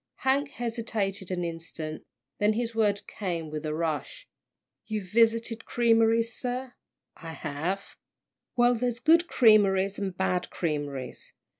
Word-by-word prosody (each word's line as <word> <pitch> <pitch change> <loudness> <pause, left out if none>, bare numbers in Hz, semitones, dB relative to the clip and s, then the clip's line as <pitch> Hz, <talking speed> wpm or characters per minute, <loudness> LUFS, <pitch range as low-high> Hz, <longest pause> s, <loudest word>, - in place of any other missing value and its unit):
Hank 275 +2 +2
hesitated 220 -6 -3
an 180 -1 -2
instant, 165 -2 -5 0.3
then 210 +1 +3
his 230 +1 -2
words 210 -2 +2
came 170 -6 -4
with 155 0 -4
a 150 - -2
rush. 165 - -3 0.6
"You've 210 -4 -4
visited 230 0 +2
creameries, 230 0 +3
sir?" 250 0 -4 0.4
"I 165 -2 -8
have." 165 +6 -4 0.6
"Well, 245 0 +5
there's 240 0 -1
good 330 +5 +4
creameries 200 -4 +4
and 190 -3 -3
bad 180 -1 0
creameries. 145 -5 -4
205 Hz, 125 wpm, -28 LUFS, 170-235 Hz, 0.6 s, Well